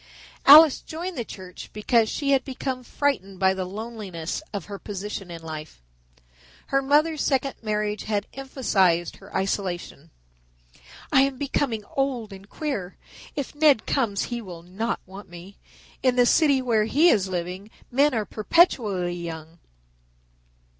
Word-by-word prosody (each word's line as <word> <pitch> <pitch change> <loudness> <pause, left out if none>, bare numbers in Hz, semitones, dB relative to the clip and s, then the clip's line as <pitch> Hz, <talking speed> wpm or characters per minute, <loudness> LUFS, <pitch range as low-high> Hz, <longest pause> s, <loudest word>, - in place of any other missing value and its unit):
Alice 300 +1 +9
joined 345 +3 -6
the 240 - -2
church 185 -4 -10
because 220 +1 +2
she 280 -2 -1
had 270 -1 +3
become 260 -1 -4
frightened 235 -9 -1
by 190 -1 +4
the 190 -1 -3
loneliness 200 - -5
of 200 -5 -5
her 200 -1 -8
position 200 -2 -6
in 165 -1 -8
life. 155 - -8 0.9
Her 275 - +4
mother's 300 +3 +2
second 270 0 +1
marriage 210 -1 -2
had 205 -1 -1
emphasized 195 -11 +1
her 195 +1 -15
isolation. 180 -5 -3 1.0
"I 265 - +6
am 275 -1 +1
becoming 265 -5 -1
old 255 -6 -1
and 195 +1 -13
queer. 240 - -4 0.4
If 285 -4 -4
Ned 295 -6 +4
comes 220 -7 0
he 240 -1 -4
will 175 -5 -10
not 200 +7 -3
want 190 +1 -11
me. 175 +3 -12 0.4
In 255 -1 +2
the 245 -1 +5
city 280 -1 +4
where 225 -4 +2
he 305 +9 +4
is 195 - +3
living 185 +2 -4 0.2
men 280 +2 +3
are 215 -2 0
perpetually 210 - +2
young. 165 0 -8
215 Hz, 145 wpm, -25 LUFS, 190-270 Hz, 1.0 s, Alice